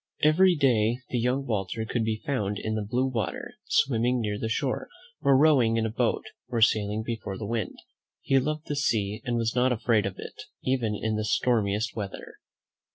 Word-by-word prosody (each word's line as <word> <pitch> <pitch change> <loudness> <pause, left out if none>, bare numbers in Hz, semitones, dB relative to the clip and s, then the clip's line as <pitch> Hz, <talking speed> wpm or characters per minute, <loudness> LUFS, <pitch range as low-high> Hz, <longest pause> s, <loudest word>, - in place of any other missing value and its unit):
Every 175 +4 +5
day 120 -5 +2
the 125 - 0
young 125 +3 0
Walter 110 -1 -2
could 115 +1 -1
be 110 -1 -2
found 105 -8 -1
in 110 - -3
the 110 - -1
blue 120 +5 0
water, 120 -5 -3
swimming 125 -1 +2
near 105 -2 -2
the 110 - -2
shore, 115 - -1 0.3
or 135 -1 +5
rowing 130 -7 +4
in 115 - +1
a 110 - -2
boat, 110 - 0 0.2
or 120 -2 -2
sailing 110 -1 +2
before 110 -4 -4
the 105 - -5
wind. 110 -3 -2 0.5
He 135 - +3
loved 150 +3 -2
the 145 - -3
sea, 110 -6 0
and 120 -2 0
was 115 0 -1
not 125 +1 +3
afraid 115 -3 +2
of 100 - -6
it, - - -9 0.2
even 120 -5 0
in 110 -1 -1
the 110 - -1
stormiest 110 0 +1
weather. 100 -3 -6
115 Hz, 190 wpm, -27 LUFS, 110-130 Hz, 0.5 s, Every